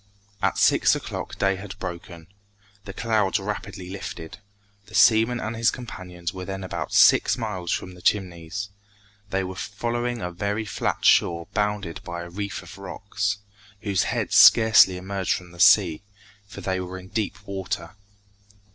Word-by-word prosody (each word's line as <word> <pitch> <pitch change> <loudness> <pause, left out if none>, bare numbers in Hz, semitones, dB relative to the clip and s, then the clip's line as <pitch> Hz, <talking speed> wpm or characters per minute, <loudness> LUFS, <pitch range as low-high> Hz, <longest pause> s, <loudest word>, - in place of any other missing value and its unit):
At - - +1
six - - +4
o'clock - - -6
day 95 -1 +1
had 100 +1 -9
broken. 85 -3 -7 0.6
The 100 - -6
clouds 110 -3 +1
rapidly 95 -2 -6
lifted. 95 -2 -7 0.5
The 110 - -10
seaman 115 +1 +5
and 110 +1 -4
his 115 +1 +3
companions 90 -8 -6
were 95 -1 -6
then 95 0 -5
about 95 - -5
six - - +5
miles 95 -7 -4
from 90 - -3
the 90 - -14
Chimneys. 95 0 -1 0.6
They 95 -1 0
were 95 0 -5
following 120 +5 -3
a 90 -4 -4
very 100 +5 -2
flat 100 - -2
shore 85 -1 +4
bounded 105 -5 -2
by 85 0 -6
a 85 - -10
reef 100 +2 -5
of 100 - -12
rocks, 100 +1 -3 0.4
whose 100 -3 0
heads - - -1
scarcely 110 -5 +7
emerged 95 +1 -2
from 90 -1 -9
the 85 - -15
sea, 90 -4 +5 0.5
for 100 - -10
they 95 -1 -1
were 90 0 -6
in 95 0 -11
deep 105 -2 -2
water. 95 -3 -4
95 Hz, 155 wpm, -24 LUFS, 90-105 Hz, 0.6 s, scarcely